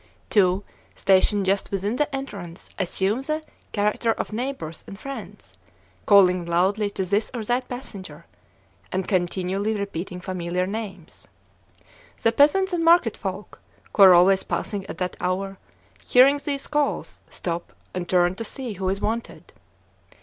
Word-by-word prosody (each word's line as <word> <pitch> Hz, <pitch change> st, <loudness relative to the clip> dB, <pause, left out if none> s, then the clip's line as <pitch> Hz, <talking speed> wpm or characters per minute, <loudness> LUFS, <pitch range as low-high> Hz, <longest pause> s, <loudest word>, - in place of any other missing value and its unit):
Two, 190 Hz, -1 st, +3 dB, 0.3 s
stationed 195 Hz, +1 st, +3 dB
just 195 Hz, +1 st, +1 dB
within 200 Hz, +4 st, -2 dB
the 295 Hz, -1 st, 0 dB
entrance, 195 Hz, -11 st, -7 dB
assume 195 Hz, +5 st, 0 dB
the 310 Hz, +3 st, -2 dB, 0.3 s
character 210 Hz, +2 st, +1 dB
of -, -, -5 dB
neighbors 230 Hz, -, -4 dB
and 195 Hz, -, -9 dB
friends, 275 Hz, +5 st, -9 dB, 0.5 s
calling 185 Hz, -3 st, +6 dB
loudly 190 Hz, +5 st, +1 dB
to 190 Hz, -1 st, -3 dB
this 205 Hz, +4 st, 0 dB
or 230 Hz, -, -3 dB
that 245 Hz, +3 st, -1 dB
passenger, 190 Hz, -, -8 dB, 0.7 s
and 185 Hz, 0 st, -2 dB
continually 190 Hz, +3 st, 0 dB
repeating 195 Hz, -3 st, -4 dB
familiar 180 Hz, 0 st, -2 dB
names. 195 Hz, -4 st, -7 dB, 1.0 s
The 225 Hz, -, +4 dB
peasants 360 Hz, +10 st, +4 dB
and 340 Hz, -1 st, 0 dB
market 330 Hz, -9 st, +5 dB
folk, 195 Hz, 0 st, -6 dB, 0.3 s
who -, -, +3 dB
are 190 Hz, -2 st, +10 dB
always 190 Hz, +2 st, +5 dB
passing 200 Hz, -3 st, -3 dB
at -, -, -7 dB
that 180 Hz, -1 st, -3 dB
hour, 195 Hz, +2 st, -2 dB, 0.4 s
hearing 275 Hz, +3 st, +5 dB
these 280 Hz, -2 st, -3 dB
calls, 295 Hz, -1 st, -1 dB
stop, 170 Hz, -1 st, -4 dB, 0.2 s
and 180 Hz, -1 st, -4 dB
turn 175 Hz, -1 st, +3 dB
to 230 Hz, -, -5 dB
see 245 Hz, 0 st, -4 dB
who 190 Hz, -1 st, -2 dB
is 195 Hz, +1 st, -2 dB
wanted. 230 Hz, +2 st, -4 dB
200 Hz, 140 wpm, -24 LUFS, 185-235 Hz, 1.0 s, are